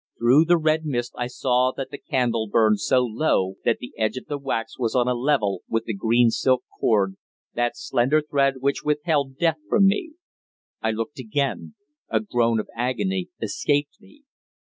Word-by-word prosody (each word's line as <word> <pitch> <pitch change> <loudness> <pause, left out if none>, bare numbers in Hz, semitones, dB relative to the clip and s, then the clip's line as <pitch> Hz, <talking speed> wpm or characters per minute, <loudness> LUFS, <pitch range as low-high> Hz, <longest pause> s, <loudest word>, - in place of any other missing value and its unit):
Through 130 +7 +5
the 175 +1 +4
red 155 0 +1
mist 120 -5 -3
I 120 - -2
saw 125 0 +1
that 135 - -5
the 140 - -7
candle 115 -4 -1
burned 110 0 +3
so 125 +5 +2
low 110 -6 0
that 115 - +2
the 125 - -9
edge 110 +3 0
of - - -7
the 145 -1 -4
wax 115 -5 -4
was 115 -1 -1
on 125 -1 +3
a 125 - +2
level 120 -7 0
with 115 0 0
the 115 - -4
green 115 +3 +3
silk 130 +1 +1 0.2
cord, 100 -3 +2 0.4
that 120 0 -1
slender 140 +2 +1
thread 140 -2 +1
which 140 +2 0
withheld 150 -2 0
Death 165 -1 +1
from 200 - +4
me. 210 - +1 0.7
I 110 - 0
looked 115 +6 -4
again. 135 - -2 0.3
A - - +2
groan 120 - +1
of 105 - -4
agony 105 -7 -1
escaped 145 - -1
me. 250 +9 -20
125 Hz, 180 wpm, -24 LUFS, 115-145 Hz, 0.7 s, Through